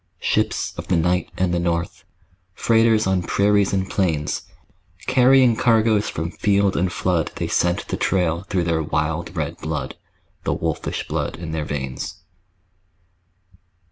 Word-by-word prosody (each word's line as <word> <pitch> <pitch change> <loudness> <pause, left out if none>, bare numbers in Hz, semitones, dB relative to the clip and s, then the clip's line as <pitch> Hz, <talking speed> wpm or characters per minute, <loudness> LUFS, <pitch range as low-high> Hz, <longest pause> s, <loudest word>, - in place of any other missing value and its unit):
Ships - - 0
of - - -6
the 90 - +2
night 90 +2 +1
and 90 -1 +1
the 85 - +1
north, 85 0 -2 0.5
Freighters 115 -1 +3
on 95 -1 +1
prairies 100 +2 +2
and 95 -1 0
plains, 80 -8 -1 0.6
Carrying 125 -1 +5
cargoes 110 -2 +3
from 80 +2 -4
field 100 -1 +1
and 90 +1 +1
flood 90 -3 0
They - - -2
scent 85 0 0
the - - -2
trail 85 -3 +1
through 95 -4 +1
their 85 -1 0
wild 80 +3 -2
red 75 -2 -2
blood, - - -4 0.5
The - - 0
wolfish - - -3
blood - - -2
in 80 -1 -7
their 80 -1 -2
veins. 65 -3 -4
90 Hz, 140 wpm, -22 LUFS, 80-100 Hz, 0.6 s, Carrying